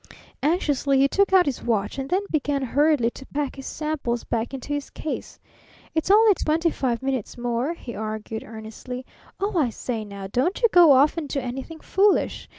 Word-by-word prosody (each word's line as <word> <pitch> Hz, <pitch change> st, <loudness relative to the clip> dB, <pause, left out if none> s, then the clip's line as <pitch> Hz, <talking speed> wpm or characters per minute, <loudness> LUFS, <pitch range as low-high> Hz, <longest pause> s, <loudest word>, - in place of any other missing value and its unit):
Anxiously 290 Hz, -4 st, +1 dB
he 270 Hz, +1 st, +5 dB
took 395 Hz, +7 st, +2 dB
out 375 Hz, -2 st, +6 dB
his 280 Hz, -, -2 dB
watch, 215 Hz, +1 st, -1 dB
and 270 Hz, 0 st, -4 dB
then 380 Hz, +3 st, +1 dB
began 290 Hz, -2 st, 0 dB
hurriedly 280 Hz, -2 st, +2 dB
to 270 Hz, -, -11 dB
pack 285 Hz, -1 st, -3 dB
his 270 Hz, -1 st, -8 dB
samples 295 Hz, -6 st, -2 dB
back 230 Hz, 0 st, -2 dB
into 270 Hz, +1 st, -7 dB
his 290 Hz, -1 st, -3 dB
case. 310 Hz, -, -6 dB, 0.6 s
"It's 320 Hz, +2 st, -1 dB
only 430 Hz, +1 st, +7 dB
twenty 330 Hz, -1 st, +1 dB
five 245 Hz, -4 st, -2 dB
minutes 265 Hz, -5 st, -2 dB
more," 245 Hz, +6 st, -1 dB
he 240 Hz, -7 st, -8 dB
argued 220 Hz, +1 st, -5 dB
earnestly. 225 Hz, +3 st, -8 dB, 0.3 s
"Oh, 400 Hz, 0 st, -1 dB
I 270 Hz, -6 st, +2 dB
say 230 Hz, -1 st, -4 dB
now, 200 Hz, -2 st, -8 dB
don't 255 Hz, -, 0 dB
you 465 Hz, -, +6 dB
go 350 Hz, -5 st, +7 dB
off 280 Hz, +5 st, +4 dB
and 305 Hz, -4 st, -3 dB
do 280 Hz, -, -1 dB
anything 265 Hz, +5 st, -6 dB
foolish! 400 Hz, +1 st, +1 dB
275 Hz, 185 wpm, -24 LUFS, 240-320 Hz, 0.6 s, only